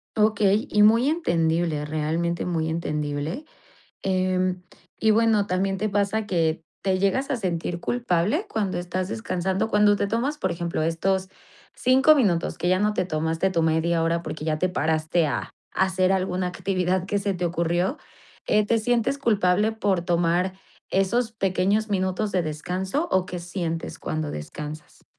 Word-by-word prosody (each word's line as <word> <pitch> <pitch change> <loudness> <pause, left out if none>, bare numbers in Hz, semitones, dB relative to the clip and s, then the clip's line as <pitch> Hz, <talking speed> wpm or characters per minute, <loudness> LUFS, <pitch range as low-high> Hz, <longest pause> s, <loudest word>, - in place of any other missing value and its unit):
Okey, 215 -1 +2
y 210 - +3
muy 230 +6 +5
entendible, 165 - 0
realmente 160 +3 -1
muy 160 -2 -1
entendible. 150 - -3 0.6
Em, 185 -1 0 0.4
y 220 - +4
bueno, 220 -2 +3
también 195 +1 0
te 215 +2 -1
pasa 205 +2 0
que 165 -4 0 0.2
te 190 -1 +1
llegas 200 +8 +1
a - - +1
sentir 175 -5 -2
culpable 240 - 0
cuando 205 -4 -1
estás 180 +1 -3
descansando, 190 -3 -1
cuando 210 -1 +4
te 200 - 0
tomas, 240 +8 -1
por 190 -10 -1
ejemplo, 170 -1 -2
estos 185 +4 0 0.5
5 265 +4 +5
minutos, 190 - +1
que 175 - 0
ya 185 0 +3
no 210 +1 +2
te 185 - 0
tomaste 160 +2 0
tu 170 -3 +1
media 165 +1 +1
hora 165 +1 +1
porque 155 -2 -6
ya 155 -1 0
te 185 - +1
paraste 160 -1 +1
a - - -3 0.2
a 190 - +3
hacer 185 0 +1
alguna 185 -1 0
actividad 185 0 -1
que 200 +1 -1
se 200 0 -1
te 180 -1 -2
ocurrió, 175 - 0 0.5
¿eh?, 210 0 +3
¿te 230 +2 +2
sientes 240 +3 +1
culpable 210 -4 +2
por 200 -5 0
tomar 175 +1 +1 0.4
esos 225 +5 +1
pequeños 200 +1 0
minutos 190 +1 -1
de 185 - +2
descanso 180 - -2
o 185 -1 +2
qué 180 -1 -5
sientes 170 -2 -4
cuando 155 -1 -3
descansas? 150 - -8
185 Hz, 160 wpm, -24 LUFS, 170-210 Hz, 0.6 s, muy